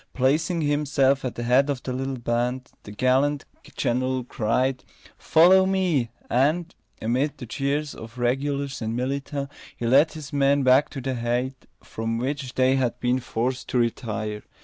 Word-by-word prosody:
Placing 155 +6 +1
himself 145 -2 +2
at 130 - -3
the 120 - -4
head 130 +4 +3
of 135 -3 -2
the 130 - -3
little 135 +1 -3
band, 120 +2 -2
the 105 - -11
gallant 130 +6 +1 0.3
general 130 +1 0
cried: 125 +3 -1 0.4
"Follow 185 +4 +5
me!" 180 -11 +1 0.2
and, 155 +7 +1 0.3
amid 130 +6 0
the 125 - -7
cheers 140 +5 -2
of 115 +2 -11
regulars 140 +3 -1
and 110 +1 -2
militia, 140 +2 -3 0.3
he 120 - -4
led 140 +7 +4
his 150 -4 -9
men 140 0 +3
back 130 +2 +4
to 135 - -6
the 130 +1 -2
height 125 +2 -2 0.2
from 115 0 -3
which 130 +1 -3
they 130 +1 +3
had 125 -3 -1
been 125 +1 +1
forced 125 +1 -3
to - - -1
retire. 110 -3 -2
130 Hz, 160 wpm, -24 LUFS, 120-140 Hz, 0.4 s, Follow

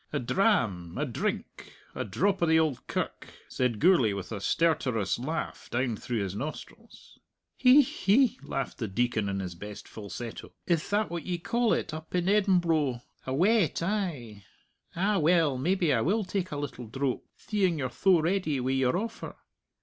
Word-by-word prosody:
"A - - -1
dram 115 - +1
a - - 0
drink - - -4 0.2
a - - -3
drop 190 - 0
o' 170 - +3
the 160 0 +5
Auld 155 -6 -1
Kirk," - - -3 0.2
said 125 -4 -1
Gourlay, 165 - +4
with 100 0 -6
a 105 -3 -4
stertorous 125 - +1
laugh 155 +7 -4
down 120 -1 0
through 115 0 -3
his 95 -2 -4
nostrils. 145 +8 -8 0.4
"Hi! 265 +2 +8
hi!" 235 +7 +3
laughed 135 -1 -4
the 110 - -2
Deacon 110 0 0
in 100 0 -2
his 90 -2 -4
best 105 +4 -9
falsetto. 110 +2 -8
"Ith 170 -3 0
that 205 -2 +1
what 170 0 -5
ye 180 -1 -1
call 235 +6 0
it - - 0
up 160 +2 -7
in 180 0 +1
Embro? 170 - +2 0.2
A 130 - -1
wet, 190 +1 +2
ay! 160 - -3 0.5
Ah, 195 +4 +1
well, 160 -3 +3
maybe 175 +2 +2
I 115 - +2
will 210 - +1
take 185 -1 -2
a 145 - -3
little 125 -4 -5
drope, 135 +2 -2
theeing 190 -6 0
you're 130 -3 -2
tho 170 - +3
ready 165 -4 0
wi' 130 +1 -1
your 130 +2 +2
offer." 225 +3 -5
155 Hz, 175 wpm, -28 LUFS, 120-185 Hz, 0.5 s, Hi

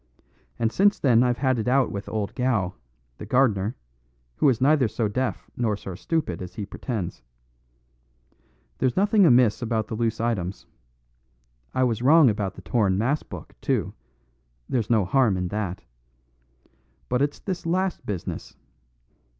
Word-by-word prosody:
And 115 -1 0
since 200 - +3
then 120 -4 +4
I've 125 -1 +2
had 130 -2 +1
it 110 - -3
out 130 +1 +3
with 100 0 -5
old 105 -2 -3
Gow, 115 -8 0 0.5
the - - -6
gardener, 110 -4 +2 0.6
who 145 - +4
is 120 -4 +1
neither 140 -1 +4
so 110 0 -1
deaf 130 +5 -2
nor 110 -4 0
so 95 -2 -7
stupid 105 - -2
as 90 -1 -8
he 105 - -4
pretends. 100 - -5 1.6
There's 130 -2 +1
nothing 205 -1 +4
amiss 125 -4 +4
about 110 -2 -1
the - - -4
loose 115 0 -1
items. 100 -5 -2 1.1
I 130 - +3
was 115 -3 0
wrong 145 0 +6
about 100 -2 -3
the - - -12
torn 100 -6 +1
mass 130 +8 +1
book, - - -10
too; - - -1 0.7
there's 115 -5 -1
no 110 -5 +3
harm 110 -1 +2
in 90 -1 -2
that. 100 -3 -3 1.2
But 125 +1 0
it's 145 0 0
this 185 -4 -5
last 185 +2 0
business. 95 -5 -5
120 Hz, 150 wpm, -25 LUFS, 105-130 Hz, 1.6 s, wrong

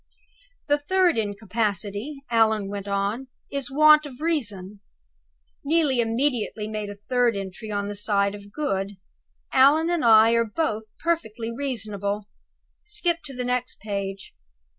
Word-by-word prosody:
"'The 290 0 +3
third 360 +3 +2
incapacity,'" 210 - -2
Allan 220 -3 +3
went 200 -1 -5
on, 200 +6 -1 0.2
"'is 275 -3 -3
want 305 +2 +6
of 255 -3 -12
reason.'" 210 - -1 0.8
Neelie 290 -3 +2
immediately 230 -2 -1
made 215 -1 -4
a 205 - -7
third 240 +2 +1
entry 195 +2 -6
on 205 -1 -2
the 205 - -4
side 200 -1 +1
of 205 0 -11
"Good": 200 -9 -2 0.6
"Allan 300 +6 +5
and 345 -5 0
I 225 -1 +7
are 230 0 +3
both 220 -2 -2 0.2
perfectly 230 -9 -1
reasonable. 210 -6 -3 0.6
Skip 395 -5 +1
to 275 - -5
the 250 0 -3
next 250 0 -2
page." 200 -2 -5
225 Hz, 135 wpm, -24 LUFS, 205-280 Hz, 0.8 s, I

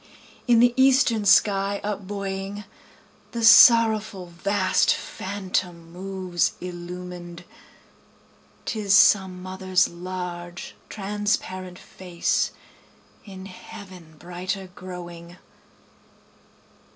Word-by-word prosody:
In 235 -2 +5
the 240 0 +5
eastern 260 -5 +3
sky 200 0 +3
up 205 -2 -4
buoying, 200 0 -5 0.7
The 235 -1 -3
sorrowful 225 -4 +6
vast 190 +1 +2
phantom 185 -3 -4
moves 185 -1 -2
illuminâd, 175 -1 -8 1.2
(âTis 215 -3 -4
some 185 -1 +4
motherâs 185 0 +1
large 175 0 -7 0.2
transparent 195 -3 -3
face, 180 -3 -2 0.8
In 190 -2 -10
heaven 185 -4 -12
brighter 180 +2 -6
growing.) 175 -1 -10
190 Hz, 80 wpm, -24 LUFS, 180-205 Hz, 1.2 s, sorrowful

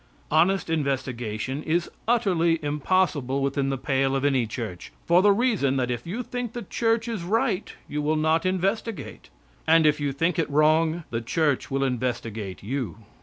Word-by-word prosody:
Honest 175 +5 +3
investigation 130 -4 -2
is 170 +2 0 0.2
utterly 180 -8 +2
impossible 145 -3 +1
within 140 0 0
the 135 - -1
pale 135 0 0
of 135 +1 0
any 130 -5 +2
church, 110 -6 -6
for 175 +2 +5
the 205 +1 +5
reason 200 - +2
that 125 -1 0
if 120 +5 -4
you 225 +8 -3
think 245 -1 -5
the 240 - -5
church 225 0 0
is 225 -5 -3
right 210 +2 0 0.2
you 150 - -3
will 150 +2 +1
not 160 +1 +2
investigate, 195 +4 -2 0.4
and 165 0 +5
if 150 0 +3
you 145 -1 -1
think 165 +6 0
it 165 - 0
wrong, 155 +3 +3
the 115 0 -1
church 145 +4 0
will 135 0 0
investigate 115 -7 -3
you. 125 -1 -3
155 Hz, 170 wpm, -25 LUFS, 135-185 Hz, 0.4 s, for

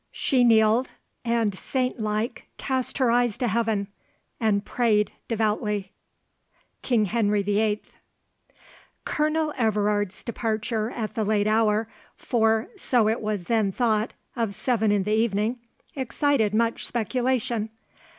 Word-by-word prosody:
She 255 -2 +2
kneeled, 225 +1 +4 0.3
and 230 -3 +1
saintlike 225 0 -2
Cast 260 -2 -2
her 255 -4 +3
eyes 240 -2 +2
to 250 -1 0
heaven, 220 -3 0 0.5
and 210 -2 +1
pray'd 215 -4 +1 0.2
devoutly. 210 -3 -1 0.9
KING 230 -5 +2
HENRY 210 -1 +1
VIII. 210 +1 +1 1.2
Colonel 305 0 0
Everard's 210 -3 0
departure 220 -1 -2
at 225 -3 -4
the 220 - -1
late 205 0 +1
hour, 215 0 +2 0.3
for, 225 -3 +1
so 245 - +2
it 220 +2 0
was 210 -4 -2
then 215 0 +1
thought, 220 0 0 0.2
of 225 -5 -1
seven 220 -1 +1
in 205 -2 +2
the 210 +2 -1
evening, 220 +2 +1 0.4
excited 265 -3 +1
much 230 +2 0
speculation. 240 -1 -1
220 Hz, 120 wpm, -25 LUFS, 210-240 Hz, 1.2 s, kneeled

